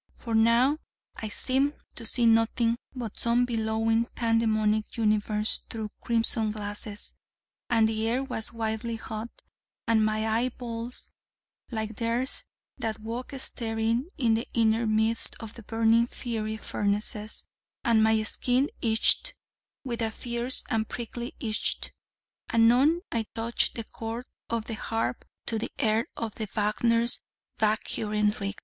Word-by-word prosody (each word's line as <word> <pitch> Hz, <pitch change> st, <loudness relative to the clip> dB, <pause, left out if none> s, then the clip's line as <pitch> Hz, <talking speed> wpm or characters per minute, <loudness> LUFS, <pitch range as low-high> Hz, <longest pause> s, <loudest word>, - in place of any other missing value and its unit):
For 230 Hz, -, -5 dB
now 235 Hz, +6 st, +4 dB, 0.4 s
I 220 Hz, -, -4 dB
seemed 270 Hz, +6 st, +2 dB, 0.2 s
to 230 Hz, -, -5 dB
see 240 Hz, +1 st, +3 dB
nothing 230 Hz, +1 st, +3 dB, 0.2 s
but 235 Hz, -5 st, -5 dB
some 235 Hz, +1 st, +3 dB
bellowing 225 Hz, 0 st, +1 dB
pandemonic 220 Hz, -2 st, +1 dB
universe 215 Hz, -1 st, +2 dB
through 220 Hz, -2 st, -4 dB
crimson 225 Hz, -1 st, +2 dB
glasses, 205 Hz, 0 st, -4 dB, 0.6 s
and 225 Hz, -2 st, +4 dB
the 220 Hz, 0 st, 0 dB
air 250 Hz, +3 st, +1 dB
was 220 Hz, -5 st, -1 dB
wildly 225 Hz, 0 st, -2 dB
hot, 220 Hz, +1 st, -5 dB, 0.6 s
and 225 Hz, -1 st, +4 dB
my 215 Hz, 0 st, +1 dB
eye 230 Hz, +3 st, +2 dB
balls 235 Hz, 0 st, -5 dB, 0.6 s
like 220 Hz, -2 st, -4 dB
theirs 235 Hz, +3 st, -1 dB, 0.3 s
that 220 Hz, -1 st, -2 dB
walk 230 Hz, +3 st, -5 dB
staring 230 Hz, +1 st, -1 dB
in 240 Hz, -6 st, +3 dB
the 225 Hz, +2 st, 0 dB
inner 225 Hz, 0 st, +3 dB
midst 220 Hz, +1 st, +1 dB
of 225 Hz, -1 st, -8 dB
burning 225 Hz, +1 st, +4 dB
fiery 220 Hz, -3 st, -3 dB
furnaces, 210 Hz, +1 st, -2 dB, 0.4 s
and 230 Hz, -2 st, +4 dB
my 220 Hz, 0 st, +4 dB
skin 250 Hz, +5 st, +2 dB
itched 225 Hz, -, +4 dB, 0.5 s
with 240 Hz, -4 st, -3 dB
a 225 Hz, -, +1 dB
fierce 240 Hz, +2 st, 0 dB
and 220 Hz, -1 st, 0 dB
prickly 240 Hz, 0 st, -5 dB
itch. 215 Hz, -3 st, 0 dB, 0.7 s
Anon 250 Hz, +9 st, +5 dB
I 225 Hz, -2 st, -1 dB
touched 230 Hz, +1 st, +1 dB
the 230 Hz, -, -3 dB
chords 230 Hz, +3 st, -6 dB, 0.2 s
of 230 Hz, -1 st, -1 dB
the 225 Hz, -, -5 dB
harp 225 Hz, +2 st, -2 dB, 0.2 s
to 225 Hz, -, 0 dB
the -, -, -3 dB
air 220 Hz, +1 st, +2 dB
of 225 Hz, -2 st, -3 dB, 0.2 s
Wagner's 230 Hz, +3 st, +2 dB, 0.4 s
'Walküren 210 Hz, -1 st, +2 dB
ritt.' 200 Hz, 0 st, -4 dB
225 Hz, 130 wpm, -28 LUFS, 220-235 Hz, 0.7 s, Anon